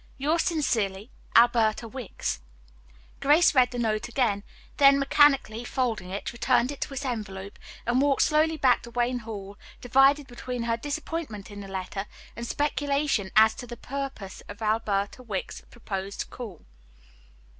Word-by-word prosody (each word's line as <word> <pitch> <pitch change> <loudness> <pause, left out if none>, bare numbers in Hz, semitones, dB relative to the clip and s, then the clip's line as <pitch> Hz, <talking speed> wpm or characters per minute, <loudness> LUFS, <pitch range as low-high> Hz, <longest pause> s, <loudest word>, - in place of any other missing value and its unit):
"Yours 305 +5 +1
sincerely, 225 - -1 0.2
"ALBERTA 230 -1 +4
WICKS." 230 - -4 0.8
Grace 305 +5 +5
read 255 -3 +5
the 245 - -6
note 225 -1 0
again, 230 -6 0 0.3
then 275 -1 +7
mechanically 275 -5 +3
folding 240 -7 -2
it, 200 +4 -4
returned 240 +1 +2
it 285 - -9
to - - -2
its 275 +1 -4
envelope, 200 -5 -5 0.3
and 245 +2 +2
walked 280 -1 +3
slowly 310 +1 +2
back 255 -4 +4
to 235 - -10
Wayne 245 +1 0
Hall 205 -3 -8 0.2
divided 270 +4 +4
between 245 -1 -5
her 230 0 +1
disappointment 290 -5 -5
in 205 0 -8
the 195 - -8
letter, 195 +1 -5 0.3
and 235 0 -5
speculation 285 -7 0
as 220 0 +7
to 245 - -9
the 240 0 -8
purport 270 -8 -6
of 205 +2 -8
Alberta 215 0 0
Wicks's 210 -6 -5
proposed 200 -4 -5
call. 215 -9 -9
240 Hz, 145 wpm, -27 LUFS, 210-275 Hz, 0.8 s, then